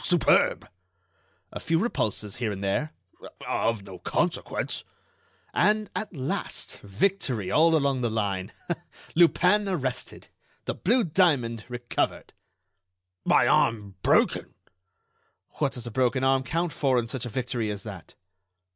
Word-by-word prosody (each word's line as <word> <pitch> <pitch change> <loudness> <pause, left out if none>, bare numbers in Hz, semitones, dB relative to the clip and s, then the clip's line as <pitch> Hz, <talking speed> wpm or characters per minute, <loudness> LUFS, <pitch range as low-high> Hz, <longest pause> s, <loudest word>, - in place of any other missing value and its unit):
"Superb!" 175 -3 +3 0.8
"A - - -6
few 165 - +1
repulses, 110 - -1
here 115 -3 -1
and 100 -1 -5
there—" 125 +11 0 0.6
"Of 115 -3 0
no 95 -2 -10
consequence." - - -1 0.7
"And, 210 +3 +2
at 215 - -3
last, 135 -7 -4
victory 110 - -1
all 165 +1 +5
along 140 -4 +1
the 120 - +1
line. 100 -4 -2 0.6
Lupin 180 +4 +4
arrested! 130 -9 -3 0.4
The - - -1
blue 240 +5 +2
diamond 140 - +2
recovered!" 120 0 -2 0.9
"My - - +5
arm 105 -4 +2
broken!" - - +2 1.0
"What 145 -3 +1
does 125 -1 -5
a 120 - -5
broken 130 +1 +1
arm 135 0 +3
count 165 +5 -1
for 135 -3 +2
in 120 - +1
such 120 +1 -3
a - - -5
victory 125 -2 -2
as 100 -1 -5
that?" 95 -6 -9
125 Hz, 130 wpm, -27 LUFS, 110-165 Hz, 1.0 s, all